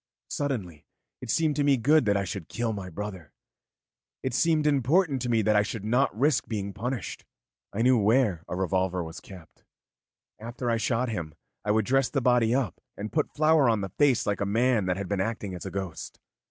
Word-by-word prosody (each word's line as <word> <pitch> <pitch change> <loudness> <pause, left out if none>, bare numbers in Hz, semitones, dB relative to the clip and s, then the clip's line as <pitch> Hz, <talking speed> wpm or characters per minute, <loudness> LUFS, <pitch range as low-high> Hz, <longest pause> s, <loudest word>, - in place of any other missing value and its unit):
Suddenly 105 - -3 0.4
it 125 - -8
seemed 155 +3 +2
to 145 - +2
me 140 -1 +4
good 145 +4 +4
that 100 -1 +2
I 100 - 0
should 95 -3 -6
kill 115 -1 -2
my 95 -3 -6
brother. 95 -3 -7 0.9
It 130 - -2
seemed 160 +2 +2
important 145 +1 +2
to 125 - -2
me 115 -2 +2
that 105 +1 +3
I 105 - +5
should 105 0 -4
not 120 0 +1
risk 145 0 +2
being 100 -3 -3
punished. 120 0 -4 0.5
I 110 +3 -1
knew 125 -1 +5
where 105 -5 +2
a - - -4
revolver 95 -1 0
was 80 0 -8
kept; 90 -5 -14 0.8
after 120 +2 -3
I - - +2
had 115 - -1
shot 120 +3 0
him, 85 -8 -5 0.3
I - - -4
would 110 0 +2
dress 135 0 +2
the 140 - 0
body 125 -2 +3
up 125 -10 -2 0.2
and 105 +2 -5
put 155 -2 -1
flour 155 -3 +4
on 110 -3 +1
the 95 - -4
face 135 - +2
like 100 -1 -1
a - - +1
man 115 -1 +2
that 90 0 0
had 100 -1 -4
been 100 -1 -1
acting 100 -2 -3
as 90 - -6
a - - -3
ghost. 95 -4 -6
110 Hz, 210 wpm, -27 LUFS, 100-130 Hz, 0.9 s, I